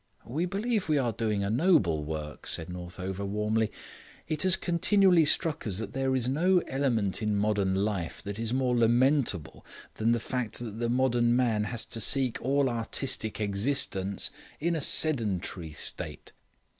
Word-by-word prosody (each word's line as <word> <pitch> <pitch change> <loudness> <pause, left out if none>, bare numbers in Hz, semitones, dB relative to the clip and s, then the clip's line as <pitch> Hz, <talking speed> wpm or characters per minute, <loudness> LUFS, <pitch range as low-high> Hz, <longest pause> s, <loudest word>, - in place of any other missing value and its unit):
"We 150 - -2
believe 210 +4 -1
that 165 - -10
we 150 - +3
are 125 -4 +1
doing 105 -3 -1
a 100 - -1
noble 110 - +2
work," 75 -1 -6
said 80 - -2
Northover 90 +2 -6
warmly. 105 +2 -1 0.6
"It 155 -2 -2
has 185 -1 +6
continually 180 -1 +3
struck 160 -2 +1
us 95 -3 +1
that 110 0 -4
there 135 0 0
is 125 -2 0
no 175 +8 +2
element 120 -8 0
in 105 -1 0
modern 100 -2 +1
life 95 -4 -2
that 100 +1 -6
is 115 0 -2
more 130 -1 +1
lamentable 120 - +1 0.3
than 110 +1 0
the 120 - +2
fact 120 -1 -4
that 115 -2 -5
the 120 0 -1
modern 120 -1 +2
man 115 -4 +1
has 115 0 -1
to 115 - 0
seek 130 +2 +3
all 140 +2 +1
artistic 115 -1 0
existence 100 -2 0 0.3
in 170 +2 0
a 160 - -2
sedentary 100 - -1
state. - - -3
115 Hz, 165 wpm, -28 LUFS, 100-140 Hz, 0.6 s, has